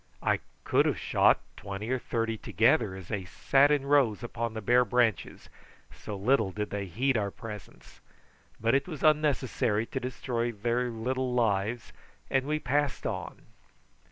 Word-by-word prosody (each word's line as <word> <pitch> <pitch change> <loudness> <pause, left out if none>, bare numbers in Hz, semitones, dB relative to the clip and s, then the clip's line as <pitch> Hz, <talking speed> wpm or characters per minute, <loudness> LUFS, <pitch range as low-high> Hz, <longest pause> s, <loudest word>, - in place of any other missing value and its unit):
I - - +2 0.2
could - - +3
have - - 0
shot - - +3
twenty 100 +4 -6
or 130 - +1
thirty 115 -1 -2
together 115 -1 +2
as 95 -2 -10
they 105 -4 -2
sat 135 +9 +3
in 145 -2 +1
rows 135 -7 +3
upon 115 -1 -4
the - - -2
bare 120 +4 +4
branches, 120 -4 0 0.5
so 105 - -7
little 110 +1 +2
did 105 +2 -4
they 100 -1 -3
heed 130 +9 0
our 100 -2 0
presence; 105 -2 -11 0.6
but 115 +1 +1
it 140 +1 +2
was 155 -6 -7
unnecessary 140 -8 +2
to - - -4
destroy 120 -1 -2
their 120 +3 -1
little 125 +2 -2
lives, 110 0 0 0.4
and 135 0 +1
we 155 +1 +1
passed 145 -1 -1
on. - - -4
120 Hz, 155 wpm, -29 LUFS, 105-130 Hz, 0.6 s, bare